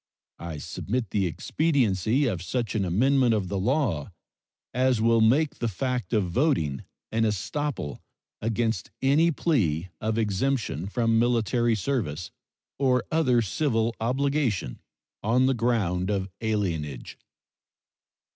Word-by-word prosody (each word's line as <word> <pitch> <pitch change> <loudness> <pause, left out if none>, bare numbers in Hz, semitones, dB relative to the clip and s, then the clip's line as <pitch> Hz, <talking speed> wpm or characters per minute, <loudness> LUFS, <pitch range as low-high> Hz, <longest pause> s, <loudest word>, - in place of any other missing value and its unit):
I 85 -2 -6
submit 115 - -3
the 100 -3 +1
expediency 115 - +1
of 95 -9 -1
such 115 +6 -2
an 105 -4 0
amendment 125 +6 +3
of 95 -4 -2
the 100 0 -1
law 105 - 0 0.6
as 130 -1 +2
will 115 0 +4
make 140 +7 +3
the 120 - 0
fact 125 -1 -2
of 100 -5 +1
voting 85 - +1 0.3
an 115 - 0
estoppel 110 - -2 0.4
against 115 -3 -1
any 145 +5 +4
plea 95 - 0
of 110 +1 -1
exemption 110 - -1
from 115 +1 +1
military 120 0 +2
service 95 - -2 0.5
or 125 -3 +3
other 130 -7 +3
civil 115 - 0
obligation 130 - 0 0.4
on 120 +5 +3
the 135 - +3
ground 105 -7 0
of 95 -2 -1
alienage. 85 - -2
115 Hz, 120 wpm, -26 LUFS, 95-130 Hz, 0.6 s, will